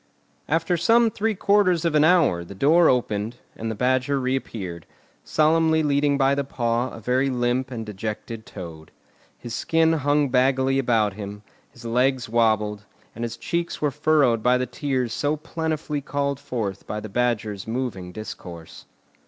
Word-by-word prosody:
After 165 +3 +1
some 225 +7 +4
three 220 +1 -1
quarters 185 -4 +3
of 165 - +1
an 150 -1 +4
hour 155 - +4
the 100 +3 -11
door 160 - +5
opened, 115 -2 0 0.2
and 115 - -4
the 110 - -3
Badger 130 +4 +1
reappeared, 110 - -4 0.4
solemnly 160 0 +3
leading 145 -1 +2
by 135 0 +3
the 140 0 0
paw 120 -1 -1
a - - -10
very 125 +5 +1
limp 125 +1 0
and 115 -3 -5
dejected 110 +2 -5
Toad. 80 -5 -9 0.5
His 120 - -8
skin 165 +5 +2
hung 145 -1 +2
baggily 130 +1 +2
about 115 -5 +2
him, 105 0 -8 0.3
his 120 -1 -15
legs 125 +2 +1
wobbled, 110 -2 +1 0.3
and 115 - -6
his 115 0 -4
cheeks 170 +8 -3
were 150 -1 +1
furrowed 145 -6 +2
by 125 +2 +3
the 125 - -1
tears 125 -2 -2
so 145 +4 0
plentifully 155 -1 -3
called 140 0 -2
forth 105 -8 -4
by 105 - -3
the 110 - -7
Badger's 110 -3 -1
moving 110 -7 -3
discourse. 90 -5 -9
125 Hz, 160 wpm, -24 LUFS, 110-150 Hz, 0.5 s, door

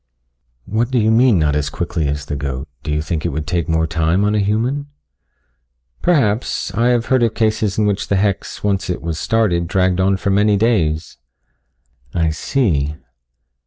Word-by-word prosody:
"What 115 +3 -1
do 130 - 0
you 110 -1 +3
mean 115 -2 +4
not 75 -3 +1
as 75 -1 0
quickly 80 -1 -2
as 70 +1 -3
the 75 - -4
goat 70 0 -4
do - - -4
you 75 +1 0
think 80 -2 -3
it 85 - 0
would 75 0 -4
take 85 -1 -2
more 80 0 +2
time 80 +4 +1
on 105 - +1
a 105 - +2
human?" 115 +8 0 1.1
"Perhaps. 125 - +1
I 115 +4 +2
have 120 -1 +2
heard 130 -1 +2
of 115 -2 +1
cases 110 -2 0
in 105 - +2
which 100 -1 -1
the 100 - +1
hex, 100 0 -1
once 100 -2 0
it 90 - -3
was 80 -2 -3
started, 90 -6 +1
dragged 95 0 +1
on 95 +1 +2
for 95 +1 -1
many 105 +1 +3
days." 85 -9 0 1.0
"I 80 -2 +1
see." 80 - 0
95 Hz, 185 wpm, -18 LUFS, 80-110 Hz, 1.1 s, mean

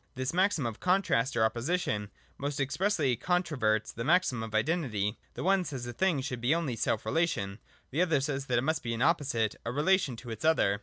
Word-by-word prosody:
This 130 +2 -2
maxim 185 -6 +2
of 115 -2 -4
Contrast 180 -10 +1
or 110 - +4
Opposition 115 - -1 0.3
most 145 +1 -3
expressly 145 -1 +1
controverts 130 - 0
the 115 - -4
maxim 160 -6 +2
of 110 -1 -5
Identity: 110 - 0 0.2
the - - -4
one 190 +1 +3
says 135 -7 -5
a 120 - -5
thing 170 -1 +1
should 125 -2 -4
be 130 +7 +3
only 155 -8 -1
self 110 -1 -1
relation, 115 - 0 0.3
the 150 +6 +1
other 165 -5 +3
says 135 0 -2
that 120 - +1
it 120 - +1
must 160 +2 0
be 115 -1 -3
an 115 - 0
opposite, 135 -9 +1
a 115 - -3
relation 150 0 +2
to 120 +1 -9
its 110 0 -7
other. 100 -11 +3
135 Hz, 205 wpm, -30 LUFS, 115-165 Hz, 0.3 s, or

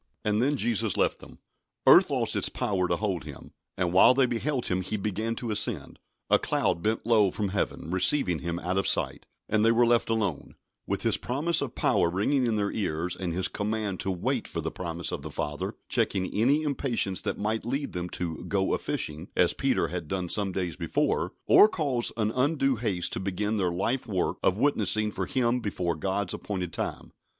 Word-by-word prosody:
And 105 +1 +2
then 140 +3 +1
Jesus 115 -5 +1
left - - +1
them. - - -14 0.5
Earth - - +7
lost - - 0
its - - +1
power 95 -3 -1
to 85 - +1
hold 95 -3 -2
Him, 75 -3 -11 0.3
and 90 -2 0
while 95 +7 +7
they 135 -1 +4
beheld 125 +2 -2
Him 90 0 0
He 100 +4 -2
began 105 +3 -2
to 115 -1 -4
ascend; 105 - -1 0.3
a - - +4
cloud 85 - 0
bent 110 +4 -1
low 110 -4 +4
from 100 +2 -2
Heaven, 95 -4 -2
receiving 95 - +3
Him 85 0 -3
out 90 +2 -1
of - - -1
sight, - - 0 0.2
and 110 0 +1
they 115 - +5
were 120 +1 +4
left 120 -1 +2
alone, 105 -9 -2 0.3
with - - -2
His - - +2
promise 155 +6 0
of 140 -4 -4
power 85 - +2
ringing 120 +9 +1
in 115 - +1
their 100 -1 0
ears, 85 -4 -2
and 90 -2 -3
His 90 +2 +1
command 105 -2 -3
to 95 - -2
"wait 90 -2 -1
for - - -4
the - - -3
promise 85 -2 -3
of - - -4
the - - -7
Father" 75 0 -4
checking 95 -1 0
any 135 +8 +2
impatience 125 -9 -1
that - - -3
might 110 +2 -2
lead 135 +5 -3
them 90 0 -4
to 85 -3 -4
"go 95 -1 0
a - - 0
fishing," 75 +4 -3
as - - +4
Peter - - 0
had 85 -3 -5
done 90 0 -3
some 100 0 0
days 90 -2 -3
before, 85 -3 -1
or 210 - +7
cause 140 - 0
an 110 -1 +1
undue 135 +1 +1
haste 100 -6 -1
to - - -2
begin 100 +3 -2
their 90 -3 0
life 120 +9 -1
work 95 -5 -1
of 95 - +2
witnessing 110 -5 +1
for - - -4
Him 125 -2 +1
before 90 -6 -2
God's 95 +4 -2
appointed 90 -4 -4
time. - - -5
105 Hz, 205 wpm, -27 LUFS, 90-120 Hz, 0.5 s, Earth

